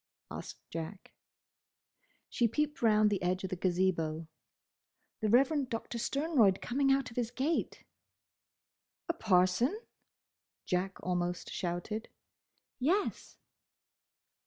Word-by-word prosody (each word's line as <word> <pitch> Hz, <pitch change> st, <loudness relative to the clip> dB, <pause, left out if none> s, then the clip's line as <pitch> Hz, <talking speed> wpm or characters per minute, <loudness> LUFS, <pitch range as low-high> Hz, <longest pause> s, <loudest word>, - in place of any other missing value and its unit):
asked -, -, -8 dB
Jack. 165 Hz, +4 st, -6 dB, 1.1 s
She 235 Hz, -, +2 dB
peeped 295 Hz, +6 st, -1 dB
round 215 Hz, -2 st, +5 dB
the 200 Hz, -2 st, 0 dB
edge 180 Hz, +1 st, 0 dB
of 190 Hz, -, -4 dB
the -, -, 0 dB
Gazebo. 175 Hz, -3 st, 0 dB, 0.9 s
"The 215 Hz, -, 0 dB
Reverend 270 Hz, +3 st, +3 dB
Doctor 230 Hz, +1 st, -4 dB
Sternroyd 260 Hz, -, +3 dB
coming 275 Hz, +2 st, +1 dB
out 270 Hz, -2 st, +1 dB
of 230 Hz, -, -14 dB
his 240 Hz, -2 st, 0 dB
gate!" 270 Hz, +7 st, -1 dB, 1.2 s
"A 335 Hz, -, +1 dB
parson?" 215 Hz, -, +2 dB, 0.9 s
Jack 185 Hz, +1 st, -1 dB
almost 175 Hz, -1 st, -2 dB
shouted. 180 Hz, +5 st, -3 dB, 0.7 s
"Yes." 355 Hz, +11 st, 0 dB
215 Hz, 105 wpm, -32 LUFS, 180-265 Hz, 1.2 s, round